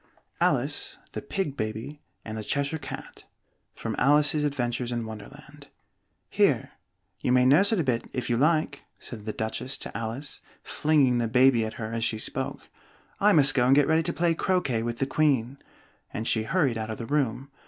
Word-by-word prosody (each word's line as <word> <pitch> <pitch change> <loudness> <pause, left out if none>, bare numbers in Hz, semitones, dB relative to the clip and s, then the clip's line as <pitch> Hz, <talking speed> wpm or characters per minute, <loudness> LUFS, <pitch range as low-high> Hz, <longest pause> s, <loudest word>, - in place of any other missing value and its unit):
ALICE, - - 0
THE - - -5
PIG 190 -8 -3
BABY, 110 +6 -5 0.2
AND 110 - -6
THE 110 - -5
CHESHIRE 140 +6 -1
CAT 135 - -9 0.5
From - - -4
'Alice's 150 +1 +4
Adventures 125 -4 -1
in 120 -1 -2
Wonderland' 110 -1 -11 0.6
"Here! - - +1 0.5
you - - -1
may 125 0 +4
nurse 165 - +5
it 220 - +2
a - - +2
bit, 120 -4 -1
if 125 -2 -3
you 120 - +1
like!" 150 +1 +1 0.2
said 110 -4 -9
the 110 - -2
Duchess 110 +5 -3
to - - -7
Alice, 115 +5 -5 0.2
flinging 140 -5 +2
the 115 - 0
baby 125 0 +4
at 110 - -7
her 110 -1 -5
as 115 0 -2
she 110 - +1
spoke. 110 - -4 0.5
"I 210 +1 +5
must 145 -6 +6
go 125 -2 +2
and 135 - +6
get 145 -1 +5
ready 160 +1 +3
to - - -1
play 170 0 +1
croquet 165 - 0
with 115 0 -3
the 135 - 0
Queen," 135 -3 +1 0.5
and 110 +1 -4
she 110 -1 +1
hurried 135 -7 +1
out 110 0 -4
of 110 - -4
the 115 - -6
room. 135 -1 -1
130 Hz, 185 wpm, -26 LUFS, 115-150 Hz, 0.6 s, must